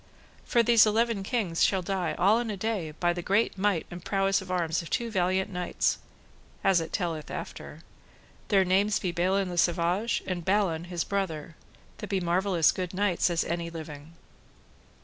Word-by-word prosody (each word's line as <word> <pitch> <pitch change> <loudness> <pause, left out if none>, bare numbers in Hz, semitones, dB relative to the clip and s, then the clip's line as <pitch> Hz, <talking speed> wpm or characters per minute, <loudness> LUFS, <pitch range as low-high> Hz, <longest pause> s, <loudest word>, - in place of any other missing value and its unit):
For 235 - +3
these 230 -1 +6
eleven 225 -1 +1
kings 195 -6 0
shall 190 -2 +2
die 190 0 -2
all 210 +5 +4
in 240 -1 -3
a 205 - -3
day, 200 -5 -2
by 175 +3 0
the 175 - -4
great 200 +6 +1
might 195 -3 0
and 175 0 -8
prowess 195 0 +1
of 185 - -11
arms 170 -2 0
of 170 - -10
two 235 -1 -1
valiant 190 0 0
knights 180 -1 -1 0.6
(as 190 -3 +4
it 165 - -6
telleth 165 -5 -3
after); - - -7 0.7
their 195 -2 +3
names 195 +3 +2
be 180 - -2
Balin 185 +2 0
le 175 - -1
Savage, 175 +6 +1
and 180 -2 -3
Balan, 185 -4 +1
his 175 -1 -2
brother, 165 -5 -3 0.4
that 210 - -6
be 195 -2 +1
marvellous 175 -1 +2
good 180 -1 -5
knights 190 -3 +1
as 170 -1 +1
be - - -5
any 170 0 -2
living. 160 -1 -9
185 Hz, 180 wpm, -28 LUFS, 170-200 Hz, 0.7 s, these